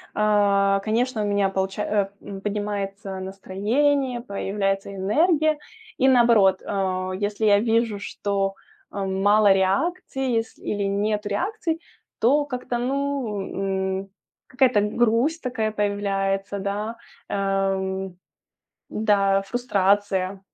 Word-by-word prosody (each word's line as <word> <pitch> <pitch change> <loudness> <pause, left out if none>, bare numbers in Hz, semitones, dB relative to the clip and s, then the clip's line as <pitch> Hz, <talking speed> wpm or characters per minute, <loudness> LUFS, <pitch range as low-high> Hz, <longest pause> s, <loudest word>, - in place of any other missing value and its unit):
а, 200 -2 +3
конечно, 230 +2 0
у - - -1
меня 200 -1 +2
получа 195 +2 -2
а, 205 -2 0
э, 195 -1 -8
поднимается 200 -1 -4
настроение, 235 +8 0
появляется 195 -2 -2
энергия. 305 - +2 0.4
И 265 - +4
наоборот, 235 -7 +5
э, 185 -1 -1
если 205 +1 -1
я 205 -1 +5
вижу, 225 -1 +1
что, 195 -1 -2 0.4
м, 195 -1 -2
мало 205 0 +5
реакций, 265 - 0
есл 225 - -4
или 205 - -2
нету 205 +1 -1
реакций, 330 - -2 0.4
то 285 +6 +3
как-то, 250 -3 -3
ну, 270 -4 -1 0.7
м, 195 - -26 0.4
какая-то 255 -5 +3
грусть 235 +9 +1
такая 225 -4 -1
появляется, 200 -1 -1
да. 205 +3 -3 0.3
Э, - - -2
м. 195 -1 -1 0.7
Да, 200 -2 +2
фрустрация. 200 -3 0
205 Hz, 110 wpm, -24 LUFS, 195-240 Hz, 0.7 s, наоборот